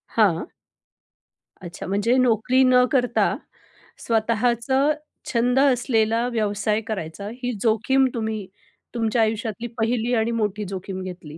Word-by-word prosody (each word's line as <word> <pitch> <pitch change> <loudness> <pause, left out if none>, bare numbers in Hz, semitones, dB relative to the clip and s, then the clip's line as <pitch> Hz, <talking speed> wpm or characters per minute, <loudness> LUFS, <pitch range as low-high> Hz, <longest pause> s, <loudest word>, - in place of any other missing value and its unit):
हां. 210 - +2 1.1
अच्छा 175 0 -8
म्हणजे 205 +6 +1
नोकरी 250 +1 +3
न 250 -1 +5
करता 250 -3 +2 0.7
स्वतःचा 235 +3 +1 0.5
छंद 245 +2 +2
असलेला 240 -3 +2
व्यवसाय 210 0 0
करायचा. 200 -2 -5 0.2
ही 250 - 0
जोखीम 245 +4 +2
तुम्ही 220 -4 -3 0.5
तुमच्या 225 0 +1
आयुष्यातली 225 +1 -1
पहिली 230 +2 0
आणि 225 +1 +1
मोठी 210 -2 -1
जोखीम 190 0 -5
घेतली. 175 -4 -9
225 Hz, 110 wpm, -23 LUFS, 210-245 Hz, 1.1 s, न